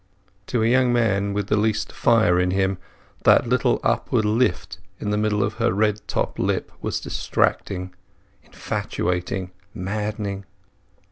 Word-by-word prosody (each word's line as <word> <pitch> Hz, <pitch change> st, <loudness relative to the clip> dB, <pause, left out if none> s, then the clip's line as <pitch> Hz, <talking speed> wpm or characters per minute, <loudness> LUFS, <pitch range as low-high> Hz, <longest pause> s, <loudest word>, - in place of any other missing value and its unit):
To 120 Hz, -3 st, 0 dB
a -, -, +3 dB
young 125 Hz, +1 st, +3 dB
man 100 Hz, -4 st, +1 dB
with 100 Hz, 0 st, -1 dB
the 105 Hz, -, +1 dB
least 110 Hz, 0 st, 0 dB
fire 110 Hz, -7 st, +3 dB
in 90 Hz, 0 st, +2 dB
him 95 Hz, 0 st, 0 dB, 0.4 s
that -, -, +5 dB
little 125 Hz, +1 st, +2 dB
upward 110 Hz, -, +1 dB
lift 105 Hz, -5 st, 0 dB, 0.2 s
in 105 Hz, -, -2 dB
the 105 Hz, -, +1 dB
middle 105 Hz, -1 st, +1 dB
of 105 Hz, -, -1 dB
her 120 Hz, -, +3 dB
red 105 Hz, +1 st, +1 dB
top -, -, -2 dB
lip -, -, -1 dB
was -, -, -2 dB
distracting, 95 Hz, -1 st, -1 dB, 0.5 s
infatuating, 90 Hz, +1 st, -3 dB, 0.2 s
maddening. 100 Hz, 0 st, -3 dB
105 Hz, 140 wpm, -23 LUFS, 95-110 Hz, 0.5 s, that